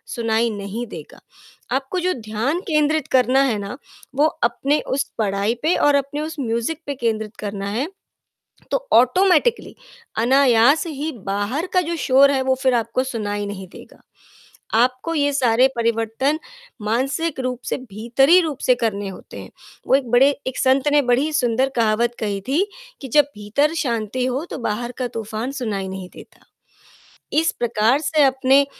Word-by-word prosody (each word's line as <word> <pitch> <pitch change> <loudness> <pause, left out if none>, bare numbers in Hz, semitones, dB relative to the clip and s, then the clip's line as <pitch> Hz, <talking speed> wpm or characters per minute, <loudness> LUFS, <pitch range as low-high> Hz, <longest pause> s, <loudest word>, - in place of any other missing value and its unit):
सुनाई 230 0 +1
नहीं 205 +3 -5
देगा, - - -11 0.5
आपको 270 +8 -1
जो 365 +1 0
ध्यान 230 +7 -2
केंद्रित 305 -2 +1
करना 255 +2 +4
है 235 -6 +1
ना, 200 +6 -6 0.4
वो 295 +2 +4 0.2
अपने 275 +5 +1
उस 275 - 0 0.2
पढ़ाई 200 +1 0
पे 325 - +3
और 290 -1 +3
अपने 280 +2 -1
उस 315 +1 -5
म्यूज़िक 235 +6 -2
पे 285 - -3
केंद्रित 220 -3 -2
करना 200 -1 -4
है, 250 +9 -2 0.8
तो - - -2
ऑटोमैटिकली, 370 - +3 0.5
अनायास 265 +4 +4
ही 305 0 -4
बाहर 205 - -2
का 365 - +5
जो 340 - -1
शोर 275 +2 +6
है, 265 -1 +1
वो 260 0 +2
फ़िर 260 -2 +3
आपको 235 +2 0
सुनाई 205 -5 -3
नहीं 190 -2 -7
देगा। - - -14 0.7
आपको 255 +8 +1
ये 285 -1 +1
सारे 255 -2 +3
परिवर्तन 230 +5 0 0.4
मानसिक 270 +7 -1
रूप 255 -1 -2
से, - - -2
भीतरी 255 - +3
रूप 310 -5 -3
से 250 - +5
करने 205 -3 -1
होते 190 - -10
हैं, - - -11 0.4
वो - - +3
एक 260 -4 +1
बड़े 265 +4 +6 0.2
एक 260 - -3
संत 265 +2 +3
ने 295 -1 +5
बड़ी 290 +5 +1
सुंदर 255 -1 +1
कहावत 230 +1 +1
कही 200 -2 -2
थी 340 +9 +2 0.3
कि, 270 - -7
"जब 295 +4 +5
भीतर 250 +10 0
शांति 235 +1 -2
हो 260 +5 -2
तो - - -5
बाहर 240 +4 -3
का 250 -1 -1
तूफान 220 +4 -4
सुनाई 200 -5 -3
नहीं 190 -1 -7
देता," - - -15 0.9
इस 325 +2 +3
प्रकार 235 +2 +2
से 305 0 +2
अपने 270 +1 +4
255 Hz, 165 wpm, -21 LUFS, 225-285 Hz, 0.9 s, शोर